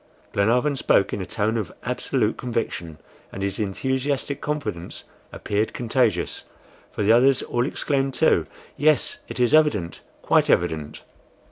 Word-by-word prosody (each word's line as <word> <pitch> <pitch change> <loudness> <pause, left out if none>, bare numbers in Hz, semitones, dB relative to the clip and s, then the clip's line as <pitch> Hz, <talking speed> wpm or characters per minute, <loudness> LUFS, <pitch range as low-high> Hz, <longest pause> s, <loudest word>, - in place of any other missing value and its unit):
Glenarvan 125 +8 +2
spoke 100 -6 +2
in 100 - -2
a 95 - -5
tone 110 +1 0
of 105 -5 -3
absolute 125 -2 0
conviction, 110 -10 -4 0.3
and 95 - -5
his 100 +1 -2
enthusiastic 130 +7 -2
confidence 145 - -4 0.3
appeared 105 +2 -2
contagious, 115 -7 0 0.5
for - - -3
the 105 - +4
others 130 +3 +5
all 120 +2 -1
exclaimed, 135 -3 -1
too, - - +3 0.3
"Yes, 150 -1 +2
it - - -7
is 125 +3 +2
evident, 130 - +2 0.2
quite - - +3
evident!" 80 -3 0
115 Hz, 135 wpm, -23 LUFS, 100-135 Hz, 0.5 s, others